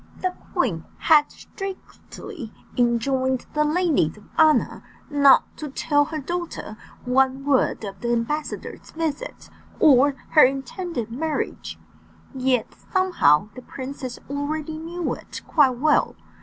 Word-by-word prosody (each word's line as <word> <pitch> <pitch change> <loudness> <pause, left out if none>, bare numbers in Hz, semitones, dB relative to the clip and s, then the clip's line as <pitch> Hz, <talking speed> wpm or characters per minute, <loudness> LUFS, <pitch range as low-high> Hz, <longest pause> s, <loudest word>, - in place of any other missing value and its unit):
The 370 -1 -1 0.2
queen 215 - 0
had 300 -2 +4
strictly 380 - -9 0.2
enjoined 255 +2 +1
the 300 - +2
ladies 300 - +1
of 210 - -15
honour 310 -1 +3 0.3
not 280 -2 +5
to 300 - -6
tell 290 +1 +1
her 315 +1 -5
daughter 335 -7 -5 0.3
one 265 +2 +2
word 275 -5 +2
of 195 -2 -7
the 235 - -1
ambassador's 265 +6 -3
visit, 315 -3 -5 0.3
or 280 -1 +5
her 305 - +7
intended 270 - -1
marriage; 305 +6 -3 0.6
yet 255 -3 0 0.2
somehow 210 - +3
the 255 - -10
princess 260 -1 -7
already 300 +2 -3
knew 340 +2 -3
it - - -9
quite 265 -5 +3
well. 300 +4 +2
280 Hz, 120 wpm, -23 LUFS, 250-315 Hz, 0.6 s, her